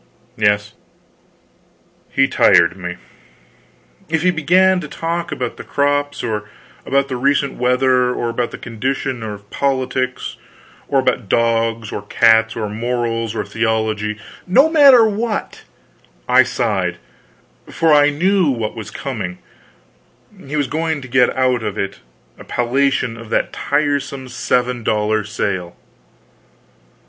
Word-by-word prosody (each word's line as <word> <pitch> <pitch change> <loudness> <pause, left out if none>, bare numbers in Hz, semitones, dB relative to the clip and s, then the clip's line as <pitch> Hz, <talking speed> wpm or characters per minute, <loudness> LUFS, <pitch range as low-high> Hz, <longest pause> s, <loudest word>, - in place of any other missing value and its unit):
Yes, 105 -1 +1 1.4
he - - +2
tired 85 +1 +4
me. 90 -2 -6 1.1
If 160 0 0
he 180 - +4
began 180 +3 +3
to 150 - -6
talk 170 +3 -3
about 125 -2 -4
the - - -8
crops; 145 0 -1
or 105 -2 -3 0.4
about 140 0 +2
the 130 - -4
recent 140 +2 +1
weather; 125 0 +2
or 120 -1 -2
about 120 0 -2
the - - -8
condition 130 +2 -3
of 105 -2 -7
politics; 130 -2 -2 0.5
or 140 - +1
about 120 -5 -1
dogs, 115 -1 +1
or - - -4
cats, 115 0 +3
or 110 -2 -3
morals, 115 0 -2
or 105 - -2
theology 110 -1 -1 0.3
no 270 - +5
matter 275 -7 +7
what 215 +1 -3 0.7
I - - +6
sighed, - - -1 0.7
for 165 -2 +2
I 145 0 +6
knew 180 +3 +2
what 115 -5 -2
was 110 -2 -7
coming; 105 -10 -5 1.1
he 145 - -4
was 145 -2 +1
going 155 +1 -2
to - - -9
get 125 -1 +3
out 130 -2 +2
of 105 -2 -4
it 100 0 -3 0.4
a - - -10
palliation 125 -1 0
of 115 -1 -11
that - - 0
tiresome 140 -3 -1
seven 125 0 -1
dollar 105 0 0
sale. 95 -4 -3
125 Hz, 130 wpm, -18 LUFS, 110-145 Hz, 1.4 s, matter